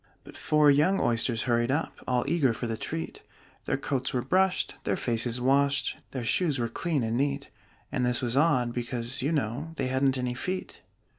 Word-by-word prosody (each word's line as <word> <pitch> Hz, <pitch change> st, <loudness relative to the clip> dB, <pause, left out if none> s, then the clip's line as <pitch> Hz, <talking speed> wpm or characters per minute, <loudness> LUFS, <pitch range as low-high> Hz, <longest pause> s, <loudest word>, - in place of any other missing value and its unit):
But -, -, -13 dB
four 150 Hz, -1 st, +4 dB
young 160 Hz, +8 st, +3 dB
Oysters 115 Hz, 0 st, +1 dB
hurried 120 Hz, -1 st, +1 dB
up, 145 Hz, +5 st, 0 dB
All 125 Hz, +1 st, +1 dB
eager 145 Hz, -6 st, +2 dB
for 115 Hz, -, -4 dB
the 115 Hz, -1 st, -2 dB
treat: 80 Hz, -6 st, -5 dB, 0.4 s
Their -, -, 0 dB
coats 135 Hz, -2 st, -2 dB
were 125 Hz, -, 0 dB
brushed, 185 Hz, +6 st, +2 dB
their -, -, 0 dB
faces 120 Hz, -3 st, -1 dB
washed, 140 Hz, +2 st, +2 dB
Their 130 Hz, -3 st, -4 dB
shoes 150 Hz, +5 st, +2 dB
were 120 Hz, -2 st, -1 dB
clean 150 Hz, +2 st, -1 dB
and 115 Hz, +1 st, -1 dB
neat 140 Hz, +2 st, -1 dB, 0.4 s
And 130 Hz, -, 0 dB
this 125 Hz, -1 st, +1 dB
was 120 Hz, -1 st, -1 dB
odd, 130 Hz, -6 st, +3 dB
because, 120 Hz, +1 st, -3 dB
you 140 Hz, +5 st, 0 dB
know, 145 Hz, +2 st, -2 dB
They 135 Hz, -4 st, -2 dB
hadn't 130 Hz, +1 st, +2 dB
any 125 Hz, -1 st, -1 dB
feet. 185 Hz, +9 st, -5 dB
130 Hz, 190 wpm, -28 LUFS, 120-145 Hz, 0.4 s, four